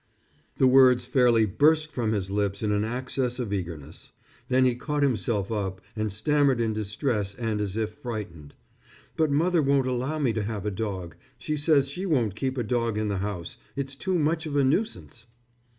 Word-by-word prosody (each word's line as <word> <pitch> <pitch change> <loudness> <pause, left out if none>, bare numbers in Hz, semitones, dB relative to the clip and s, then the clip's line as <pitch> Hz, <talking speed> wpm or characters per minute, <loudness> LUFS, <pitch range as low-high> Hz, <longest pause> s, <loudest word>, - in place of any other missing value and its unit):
The - - +4
words 130 -1 +6
fairly 120 -3 +4
burst 150 +8 +2
from 115 -5 -1
his 95 -3 -2
lips 100 0 -1
in 105 - +1
an 105 0 +1
access 125 +2 -2
of 115 -5 -3
eagerness. 80 -6 -6 0.4
Then 130 0 +3
he 125 - +3
caught 145 +4 -2
himself 110 -5 0
up 95 -3 -2 0.2
and 110 -1 -2
stammered 140 +5 +2
in 115 -2 0
distress 105 -1 -2
and 110 -3 -2
as 100 0 -3
if 110 -1 -1
frightened: 95 - -7 0.6
"But 155 -1 +2
mother 165 +4 +2
won't 140 -2 +2
allow 130 +4 -1
me 135 -7 +1
to 110 - -1
have 105 -1 -4
a 105 - 0
dog. 95 -5 -4 0.2
She 155 - -3
says 145 -2 +3
she 180 +8 -4
won't 120 - +1
keep 130 +3 -2
a 120 - 0
dog 115 -1 -1
in 110 -1 -1
the 100 - -1
house. 95 -4 -4 0.2
It's 135 0 -3
too 185 +6 -1
much 160 +1 0
of 145 - -4
a 140 - +4
nuisance." 155 - -1
120 Hz, 190 wpm, -26 LUFS, 105-140 Hz, 0.6 s, words